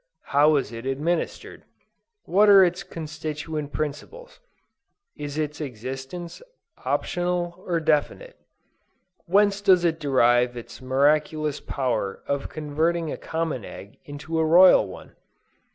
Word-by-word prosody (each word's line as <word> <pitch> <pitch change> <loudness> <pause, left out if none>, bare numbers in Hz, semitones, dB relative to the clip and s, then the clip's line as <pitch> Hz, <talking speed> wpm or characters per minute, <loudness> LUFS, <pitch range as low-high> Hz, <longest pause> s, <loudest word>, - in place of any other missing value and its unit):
How 150 +2 +5
is 135 -6 -1
it 115 +2 -7
administered? 150 +6 -3 0.6
What 205 +3 +3
are 195 -1 +8
its 175 +1 -2
constituent 155 -1 -6
principles? 155 - -6 0.8
Is 145 -1 -6
its 150 0 -3
existence 135 +6 -7 0.4
optional 175 0 -2
or 170 -2 0
definite? 160 - -1 0.9
Whence 200 +2 +3
does 185 -3 +4
it 165 -1 0
derive 125 -4 +2
its 120 - -10
miraculous 150 +3 +1
power 120 -7 -3
of 140 -1 -3
converting 155 +2 -1
a - - -3
common 160 -7 -3
egg 100 +1 -11
into 150 +3 -5
a - - +3
royal 170 - +6
one? 95 - -12
155 Hz, 120 wpm, -24 LUFS, 140-170 Hz, 0.9 s, are